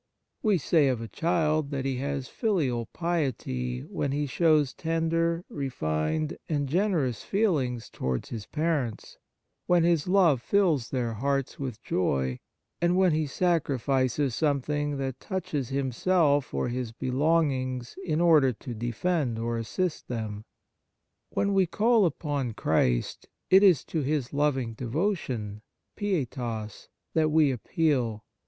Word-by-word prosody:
We 210 -4 +3
say 155 -1 +3
of 130 -3 +1
a 115 - -5
child 155 -1 0
that 135 -2 -3
he 135 -2 -1
has 140 0 -3
"filial 145 - 0
piety" 125 - -2
when 140 - -3
he 145 +1 0
shows 150 -1 +2
tender, 165 +1 0
refined 130 - -2
and 145 -3 0
generous 155 - 0
feelings 145 - 0
towards 65 -1 -3
his 110 -3 -6
parents, 150 -8 -2 0.5
when 175 -1 +4
his 170 -2 +2
love 180 -9 +4
fills 165 - +2
their 120 -3 -1
hearts 135 +4 -1
with 130 -5 -5
joy, 65 -8 0 0.4
and 175 +1 +3
when 185 -2 +4
he 155 -1 0
sacri 165 -2 +1
fices 130 +2 +1
something 145 +1 0
that 135 -2 -3
touches 150 - -3
himself 140 +2 +1
or 70 - -1
his 120 -1 -3
belongings 130 -1 0
in 155 -2 0
order 155 -6 +5
to 120 +2 -8
defend 120 +3 -1
or 115 +1 -2
assist 160 +10 -2
them. 110 -3 -4 0.8
When 200 0 0
we 190 -2 +3
call 220 +2 +3
upon 145 -6 -2
Christ, - - 0 0.2
it 190 +1 +8
is 185 -7 +5
to 160 - -2
His 140 -2 -1
loving 135 -5 0
devotion 120 - -2 0.3
(pietas) 125 - -3 0.3
that 155 -1 +3
we 150 -2 +4
appeal. 125 - 0
140 Hz, 135 wpm, -27 LUFS, 120-165 Hz, 0.8 s, it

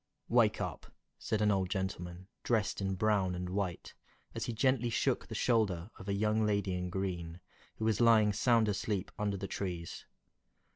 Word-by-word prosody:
"WAKE - - +4
up!" - - -5 0.3
said 110 -1 -1
an 105 - +4
old 95 -2 +1
gentleman, 90 -1 -4
dressed 110 -3 0
in 95 -1 -1
brown 100 -2 +1
and 90 0 -4
white, 95 -3 -3 0.4
as - - -3
he - - -2
gently 125 +1 +2
shook 115 - 0
the - - -6
shoulder 105 -6 +1
of 95 - -7
a - - +1
young 110 +2 +1
lady 100 -3 +1
in 90 0 -2
green, 90 -3 -3 0.4
who 110 - -3
was 110 0 +2
lying 110 -3 +5
sound 115 +1 +3
asleep 100 -1 -2
under 105 -1 0
the 100 - -4
trees. 90 -4 -5
100 Hz, 175 wpm, -33 LUFS, 90-110 Hz, 0.4 s, lying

